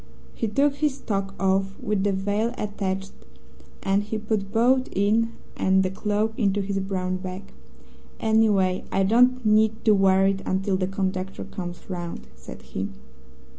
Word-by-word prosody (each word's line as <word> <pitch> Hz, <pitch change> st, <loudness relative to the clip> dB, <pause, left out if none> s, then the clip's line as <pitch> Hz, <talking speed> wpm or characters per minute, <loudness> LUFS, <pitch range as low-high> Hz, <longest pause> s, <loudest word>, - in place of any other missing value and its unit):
He 225 Hz, -, -2 dB
took 280 Hz, +6 st, +2 dB
his 290 Hz, -2 st, 0 dB
toque 195 Hz, -2 st, -3 dB
off 195 Hz, 0 st, +1 dB
with 210 Hz, -2 st, -1 dB
the 205 Hz, -, +2 dB
veil 205 Hz, +5 st, -1 dB
attached, 195 Hz, -2 st, -3 dB, 0.7 s
and 195 Hz, +1 st, +2 dB
he 215 Hz, +2 st, -4 dB
put 210 Hz, -2 st, -2 dB
both 250 Hz, +4 st, +3 dB
it 210 Hz, +4 st, +3 dB, 0.3 s
and 190 Hz, 0 st, +3 dB
the 185 Hz, -, -1 dB
cloak 210 Hz, +2 st, -1 dB
into 205 Hz, -2 st, +2 dB
his 195 Hz, 0 st, -2 dB
brown 185 Hz, -1 st, -2 dB
bag. 185 Hz, +1 st, -7 dB, 0.7 s
'Anyway, 210 Hz, -4 st, +2 dB
I 195 Hz, -, +2 dB
don't 250 Hz, +4 st, +4 dB
need 220 Hz, +1 st, +3 dB
to 215 Hz, -, +6 dB
wear 195 Hz, -1 st, +4 dB
it 195 Hz, 0 st, +1 dB
until 190 Hz, +1 st, 0 dB
the 185 Hz, -1 st, 0 dB
conductor 190 Hz, 0 st, -3 dB
comes 175 Hz, -2 st, -7 dB
round,' 175 Hz, -2 st, -5 dB
said -, -, -11 dB
he. 95 Hz, +1 st, -4 dB
195 Hz, 155 wpm, -25 LUFS, 190-220 Hz, 0.7 s, to